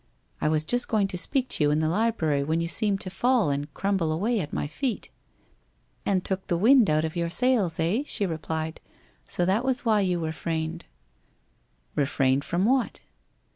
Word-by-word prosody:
I - - +2
was 155 0 +1
just 245 +8 0
going 210 -3 +1
to - - -3
speak 260 +7 0
to - - 0
you 145 - +4
in 150 - +2
the 155 0 +1
library 165 -7 +1
when 160 +3 0
you 170 - -1
seemed 200 +3 0
to 185 - -4
fall 230 - +2
and 145 +1 -3
crumble 195 -5 0
away 210 +9 0
at 150 -5 -4
my - - -2
feet.' 235 - -3 0.5
' - - -41
And 190 -2 +1
took 190 -1 -3
the 175 - +1
wind 230 - +5
out 155 +1 +2
of 160 - -5
your 170 -1 -1
sails, 210 -5 +1
eh? 175 +10 +1
' - - -22
she 205 - +2
replied. 160 -1 -4
c - - -36 0.4
So 175 - +1
that 195 +6 +1
was 260 -1 -1
why 215 -2 +3
you 180 -2 +1
refrained.' 160 0 -3
f - - -35 1.1
Refrained 135 -1 +1
from 175 +6 0
what 255 +1 +1
175 Hz, 205 wpm, -26 LUFS, 160-215 Hz, 1.1 s, wind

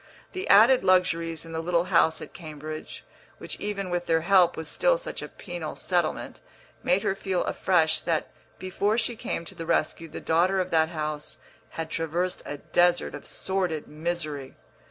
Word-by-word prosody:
The 375 0 -4
added 235 +4 +7
luxuries 170 -3 +2
in 165 - -10
the 160 0 -2
little 170 0 +1
house 170 -3 +3
at - - -11
Cambridge, 155 -1 -8 0.3
which - - -6
even 200 -3 -3
with 175 0 -1
their 165 -1 +3
help 180 0 +4
was 160 -1 -4
still - - +3
such - - -6
a - - -5
penal 175 -5 -6
settlement, 175 -4 -1 0.4
made 185 +2 +2
her - - +1
feel 190 -2 -1
afresh 160 -4 +2
that 165 -2 -1 0.3
before 200 +4 0
she 240 +1 0
came 170 - -4
to - - -7
the 165 - -7
rescue 165 0 0
the - - -7
daughter 180 +4 +2
of 185 - -1
that 160 -1 +3
house 155 -2 -4 0.4
had 165 0 -4
traversed 170 +3 -1
a 145 - -4
desert 175 +4 +2
of - - -8
sordid 185 -5 -2
misery. 155 -4 -3
170 Hz, 175 wpm, -27 LUFS, 160-185 Hz, 0.4 s, added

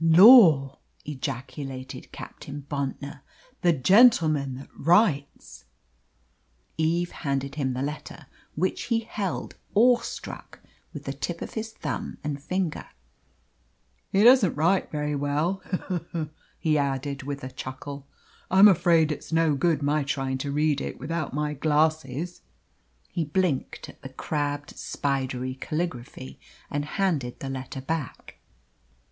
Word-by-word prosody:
'" - - -3
"Lor!" 165 - +8 0.3
ejaculated 135 -1 -6
Captain 140 0 -9
Bontnor, 140 0 -4 0.4
"the 175 - +4
gentleman 155 - +4
that 135 - -10
writes." 165 - +1 1.1
Eve 170 +2 0
handed 140 -2 -3
him 135 -3 -1
the 130 +2 -2
letter, 150 +1 -6 0.3
which 185 +5 -1
he 230 -2 +1
held, 205 -4 -4 0.2
awestruck, 240 +3 +1 0.3
with - - -8
the - - -3
tip - - -4
of - - -8
his 220 0 -4
thumb - - -5
and 145 -2 -3
finger. 180 +1 -2 1.2
"He 195 - +4
doesn't 240 - +6
write 170 +6 +2
very 150 -1 -2
well 150 +7 0
he, 180 -1 -2 0.2
he!" 155 -1 -3 0.3
he 155 -2 +1
added, 140 0 -2
with 140 0 -5
a 130 - -6
chuckle. 135 +1 -7 0.4
"I'm 190 +3 +8
afraid 165 -4 +4
it's 150 - -6
no 165 -2 +3
good 150 +1 +1
my 150 +2 +2
trying 135 -1 -2
to 140 +1 -3
read 150 -1 +1
it - - -5
without 155 +2 -3
my 150 +1 -1
glasses." 155 +2 0 0.7
He 170 - -2
blinked 155 -2 -1
at - - -15
the 135 - -8
crabbed 145 +1 -3
spidery 130 -2 -2
caligraphy, 125 - -4 0.3
and 145 0 -1
handed 150 -8 -1
the 135 - -5
letter 130 0 -6
back. 150 -2 -5
150 Hz, 130 wpm, -26 LUFS, 135-170 Hz, 1.2 s, Lor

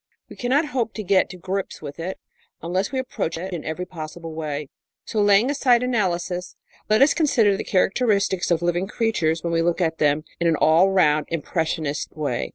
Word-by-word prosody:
We - - -11
cannot 265 +6 +1
hope 235 -4 -1
to 215 - -4
get 190 0 +3
to 180 - -9
grips 190 +2 -4
with 145 0 -9
it 180 +3 -4 0.5
unless 185 +4 -1
we 270 - -2
approach 255 -10 -3
it 185 +3 -5
in 170 - -4
every 160 +3 -4
possible 165 -1 -8
way. 150 -2 -4 0.4
So, 215 - -1
laying 205 +5 +4
aside 250 -4 +3
analysis, 180 -7 -1 0.3
let 215 +5 +5
us 285 - +4
consider 230 - +3
the - - -4
characteristics 200 -2 +1
of 170 -1 +1
living 175 +2 0
creatures 185 -8 0
when 170 -1 -2
we 165 - +2
look 170 +1 +1
at 165 -2 0
them 150 0 +2 0.2
in 170 - +1
an 165 - +3
all 160 +5 +4
round 155 -5 +3
impressionist 160 -2 -2
way. 145 -6 -2
180 Hz, 190 wpm, -23 LUFS, 160-210 Hz, 0.5 s, let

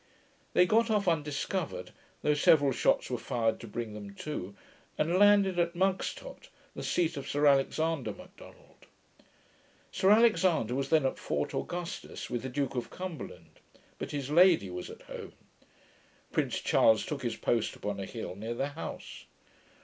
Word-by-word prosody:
They 180 - +6
got 230 +4 +3
off 210 -3 +1
undiscovered, 150 - -2 0.3
though 150 - +3
several 145 -1 +4
shots 130 - +1
were 125 - -1
fired 115 -3 -1
to 115 - -9
bring 110 0 -5
them 100 -1 -9
to, 100 -8 -5 0.4
and 170 +4 +1
landed 200 -3 +5
at 170 0 +1
Mugstot, 190 - -2 0.3
the - - -6
seat 170 -4 0
of 140 - -6
Sir 145 +1 +1
Alexander 145 +2 +2
Macdonald. - - -15 1.0
Sir 190 - +2
Alexander 185 - +4
was 135 +1 -2
then 155 -4 +4
at 130 - -1
Fort - - -2
Augustus, 175 -7 -5
with 120 -1 -1
the 130 - -5
Duke 140 +2 -2
of 125 -2 -3
Cumberland; 180 -4 -8 0.4
but - - -4
his 145 -1 -4
lady 165 - +5
was 90 0 -6
at - - -11
home. - - -9 1.0
Prince - - -1
Charles 110 -1 +4
took 145 -3 -4
his 120 -3 -2
post 115 -2 0
upon 100 -1 -4
a 95 - -4
hill 110 -6 -6
near 110 +4 -5
the 135 +4 -1
house. 145 +3 -8
145 Hz, 155 wpm, -30 LUFS, 120-175 Hz, 1.0 s, They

